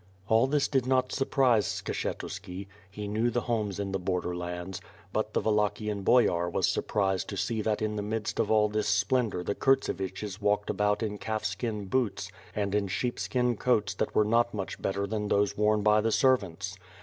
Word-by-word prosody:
All 115 Hz, +4 st, +4 dB
this 145 Hz, 0 st, +2 dB
did 130 Hz, -3 st, 0 dB
not 130 Hz, -1 st, +2 dB
surprise 130 Hz, -6 st, +2 dB
Skshetuski. 95 Hz, 0 st, -4 dB, 0.2 s
He 105 Hz, +1 st, -6 dB
knew 110 Hz, +4 st, +1 dB
the 120 Hz, 0 st, 0 dB
homes 110 Hz, -5 st, -2 dB
in 100 Hz, -1 st, -2 dB
the 95 Hz, -, -1 dB
border 90 Hz, -1 st, -2 dB
lands; 90 Hz, +2 st, -5 dB, 0.3 s
but 110 Hz, 0 st, -1 dB
the -, -, +3 dB
Wallachian 105 Hz, -1 st, 0 dB
Boyar 90 Hz, -6 st, +3 dB
was -, -, +1 dB
surprised 95 Hz, -2 st, 0 dB
to 100 Hz, -, -5 dB
see 110 Hz, +3 st, -1 dB
that 105 Hz, 0 st, 0 dB
in 105 Hz, 0 st, -1 dB
the -, -, -1 dB
midst 105 Hz, +1 st, -3 dB
of 110 Hz, -, +1 dB
all 110 Hz, -1 st, +4 dB
this 105 Hz, 0 st, -1 dB
splendor 105 Hz, -1 st, +1 dB
the 100 Hz, -, -1 dB
Kurtsevichis 100 Hz, -5 st, 0 dB
walked 105 Hz, 0 st, +1 dB
about 105 Hz, +2 st, +1 dB
in 105 Hz, -2 st, -3 dB
calf 110 Hz, -1 st, -3 dB
skin 105 Hz, +1 st, -2 dB
boots 100 Hz, -3 st, -1 dB, 0.2 s
and 100 Hz, -1 st, -1 dB
in 105 Hz, -1 st, +1 dB
sheep 120 Hz, +6 st, -2 dB
skin 125 Hz, -2 st, +1 dB
coats 105 Hz, -6 st, +1 dB
that -, -, -3 dB
were 105 Hz, -, +4 dB
not 120 Hz, +1 st, +2 dB
much 100 Hz, -2 st, -5 dB
better 100 Hz, +1 st, -1 dB
than 105 Hz, 0 st, -2 dB
those 100 Hz, 0 st, +2 dB
worn 105 Hz, 0 st, +2 dB
by 105 Hz, 0 st, +5 dB
the 115 Hz, +1 st, +1 dB
servants. 100 Hz, -7 st, +1 dB
105 Hz, 190 wpm, -29 LUFS, 100-115 Hz, 0.3 s, by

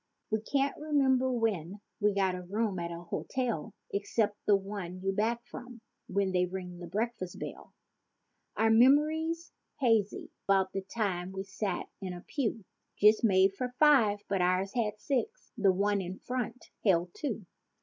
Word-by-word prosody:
We 220 Hz, 0 st, +1 dB
can't 275 Hz, +4 st, 0 dB
remember 265 Hz, -4 st, +2 dB
when 210 Hz, -6 st, -1 dB, 0.2 s
we 205 Hz, -1 st, +2 dB
got 190 Hz, -2 st, +2 dB
a 180 Hz, -, -4 dB
room 200 Hz, +1 st, -1 dB
at 170 Hz, 0 st, -3 dB
a 170 Hz, 0 st, -6 dB
hotel 230 Hz, +2 st, -3 dB, 0.2 s
Except 205 Hz, +1 st, 0 dB
the 205 Hz, -, +7 dB
one 195 Hz, -2 st, -4 dB
you 195 Hz, -, +1 dB
back 230 Hz, +4 st, 0 dB
from 245 Hz, -1 st, -10 dB, 0.3 s
when 195 Hz, 0 st, 0 dB
they 180 Hz, -1 st, +2 dB
ring 180 Hz, -1 st, -6 dB
the 175 Hz, -, -7 dB
breakfast 205 Hz, -1 st, -3 dB
bell. -, -, -8 dB, 0.8 s
Our 225 Hz, 0 st, +4 dB
memory's 310 Hz, +7 st, +4 dB, 0.3 s
hazy 225 Hz, -6 st, +1 dB, 0.2 s
'bout 190 Hz, -1 st, +3 dB
the 195 Hz, -, -1 dB
time 190 Hz, -3 st, -2 dB
we 190 Hz, -, -3 dB
e'er -, -, -5 dB
sat 200 Hz, 0 st, -3 dB, 0.2 s
in 185 Hz, -2 st, -4 dB
a 175 Hz, -, -8 dB
pew 225 Hz, -4 st, -2 dB, 0.3 s
Just 215 Hz, +2 st, +5 dB
made 195 Hz, -2 st, +5 dB
for 250 Hz, +2 st, -4 dB
five—but 210 Hz, -10 st, +4 dB
ours 185 Hz, +2 st, +1 dB
had 215 Hz, -3 st, -1 dB
six—the 265 Hz, -, 0 dB
one 200 Hz, +2 st, +1 dB
in 185 Hz, +1 st, -5 dB
front 250 Hz, -1 st, -4 dB
held 175 Hz, -4 st, +3 dB
two. 230 Hz, -9 st, -4 dB
205 Hz, 160 wpm, -31 LUFS, 190-240 Hz, 0.8 s, the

